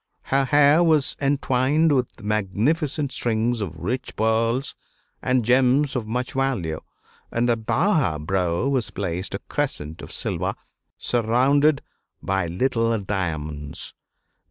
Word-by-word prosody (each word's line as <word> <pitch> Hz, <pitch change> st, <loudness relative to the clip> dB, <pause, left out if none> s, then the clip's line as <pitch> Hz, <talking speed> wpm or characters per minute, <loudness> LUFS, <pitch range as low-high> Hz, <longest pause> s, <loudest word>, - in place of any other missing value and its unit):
Her 135 Hz, 0 st, +1 dB
hair 145 Hz, +3 st, +5 dB
was 155 Hz, -5 st, +3 dB
entwined 140 Hz, +2 st, +2 dB
with 125 Hz, -4 st, -1 dB
magnificent 130 Hz, -, 0 dB
strings 115 Hz, -1 st, 0 dB
of 85 Hz, -6 st, -4 dB
rich 120 Hz, +11 st, -4 dB
pearls 115 Hz, +4 st, +1 dB, 0.5 s
and 125 Hz, -3 st, +1 dB
gems 130 Hz, +3 st, +3 dB
of 115 Hz, -4 st, -2 dB
much 125 Hz, +3 st, -2 dB
value, 120 Hz, -13 st, -1 dB, 0.5 s
and 120 Hz, +1 st, +1 dB
above 115 Hz, -, +1 dB
her 90 Hz, -, +1 dB
brow 90 Hz, -, 0 dB
was 130 Hz, -5 st, 0 dB
placed 90 Hz, -1 st, -3 dB
a -, -, -4 dB
crescent 75 Hz, +2 st, -3 dB
of -, -, -10 dB
silver, -, -, -1 dB, 0.4 s
surrounded 135 Hz, +6 st, +2 dB, 0.4 s
by 95 Hz, -2 st, -1 dB
little 115 Hz, +5 st, +1 dB
diamonds. 80 Hz, -8 st, -4 dB
120 Hz, 120 wpm, -23 LUFS, 95-135 Hz, 0.5 s, hair